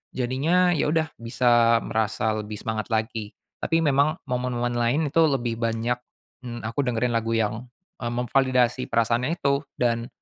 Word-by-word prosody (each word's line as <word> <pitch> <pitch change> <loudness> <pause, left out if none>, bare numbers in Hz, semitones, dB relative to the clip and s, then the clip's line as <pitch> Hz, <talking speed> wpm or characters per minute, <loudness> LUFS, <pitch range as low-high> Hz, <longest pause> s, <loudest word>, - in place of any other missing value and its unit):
jadinya, 155 +9 +2
ya 160 - +1
udah 160 0 0
bisa 115 0 +3
merasa 110 0 0
lebih 105 0 -6
semangat 110 0 -4
lagi. 110 -2 -2 0.3
Tapi 165 - +1
memang 145 +2 +2
momen-momen 125 -2 -1
lain 120 +5 +1
itu 165 - +5
lebih 120 -4 -1
banyak, 115 +1 -1 0.5
mmm, 120 -1 -6
aku 115 +5 -4
dengerin 125 -3 +1
lagu 115 0 0
yang, 110 +2 -1 0.3
eee, 120 - -3
memvalidasi 125 +1 +1
perasaannya 115 +7 +1
itu 140 -4 +1 0.2
dan, 115 -1 0
120 Hz, 145 wpm, -25 LUFS, 115-135 Hz, 0.5 s, itu